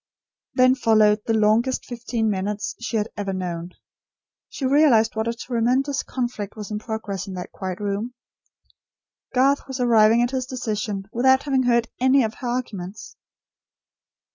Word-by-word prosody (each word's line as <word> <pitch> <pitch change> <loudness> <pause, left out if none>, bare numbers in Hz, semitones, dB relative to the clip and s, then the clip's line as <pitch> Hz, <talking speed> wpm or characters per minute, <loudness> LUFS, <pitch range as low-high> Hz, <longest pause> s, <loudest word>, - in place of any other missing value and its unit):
Then 255 0 +5
followed 215 -4 +3
the 225 - +2
longest 220 +4 +2
fifteen 235 -2 -2
minutes 210 +1 -2
she 235 -1 -2
had 210 +1 -1
ever 200 -2 -3
known. 175 -1 -4 0.8
She 270 - -5
realised 260 -6 +4
what 220 +1 -1
a 230 - 0
tremendous 255 +4 0
conflict 240 -6 -4
was 215 -1 -7
in 210 - -2
progress 215 -4 -5
in 190 - -6
that 180 - -7
quiet 185 -2 -5
room. 210 +4 -3 1.2
Garth 275 +3 +3
was 265 -1 -5
arriving 230 -1 +5
at 245 - -1
his 260 -1 -2
decision 215 -5 -3
without 260 +2 +4
having 270 -3 +1
heard 235 -1 +3
any 260 +1 +4
of 220 -1 -2
her 250 - -4
arguments. 215 -6 -5
230 Hz, 150 wpm, -23 LUFS, 210-255 Hz, 1.2 s, Then